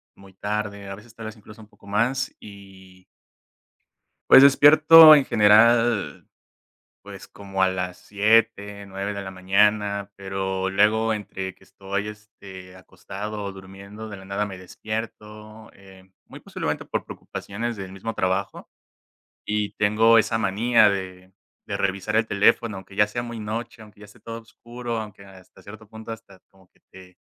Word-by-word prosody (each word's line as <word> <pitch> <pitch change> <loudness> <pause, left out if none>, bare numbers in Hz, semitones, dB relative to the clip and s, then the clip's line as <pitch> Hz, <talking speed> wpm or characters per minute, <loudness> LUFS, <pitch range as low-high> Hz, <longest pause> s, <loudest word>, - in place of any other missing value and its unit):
muy 95 -1 -18
tarde, 105 0 -5
a 100 - -6
veces 110 +3 -17
tal 115 -1 -8
vez 110 0 -10
incluso 105 +1 -15
un 105 - -15
poco 100 - -21
más 125 +6 -1
y 95 -2 -15 1.3
pues 135 - +9
despierto 155 +3 +8
en 140 -3 +3
general, 115 +1 +3 0.8
pues - - -11
como 95 -1 -6
a 95 - +4
las 90 -1 -5
7:00, 105 -1 0
9:00 100 +1 -5
de 100 - -6
la 95 - -7
mañana, 100 +2 0
pero 95 -1 -4
luego 110 +3 +2
entre 95 -2 -6
que 95 - -25
estoy, 100 +2 -5
este, 100 -3 -12
acostado 105 +3 -8
o 100 - -5
durmiendo 100 +3 -11
de 100 - -9
la 95 - -13
nada 100 +2 -3
me 95 - -9
despierto, 110 +2 -8
eh, 95 -1 -18 0.2
muy - - -13
posiblemente - - -5
por - - -4
preocupaciones 115 +3 -7
del 95 -1 -8
mismo 100 +4 -7
trabajo 95 +1 -2 0.8
y 105 -1 -2
tengo 110 +2 +3
esa 110 0 +2
manía 115 +3 +3
de 95 -1 -6 0.3
de - - -4
revisar 100 +2 -2
el 110 0 +2
teléfono, 105 +1 +1
aunque 95 0 -12
ya 105 +1 +3
sea 120 +3 -5
muy 120 -1 -7
noche, 115 +2 -6
aunque 105 -1 -16
ya - - -12
esté 105 - -18
todo 115 0 -8
oscuro, 120 +1 -7
aunque 105 -2 -10
hasta 95 -2 -18
cierto 110 +1 -13
punto 110 +1 -9
hasta 100 -4 -13
como 95 -1 -25
que - - -34
te 90 -1 -16
105 Hz, 160 wpm, -23 LUFS, 95-110 Hz, 1.3 s, pues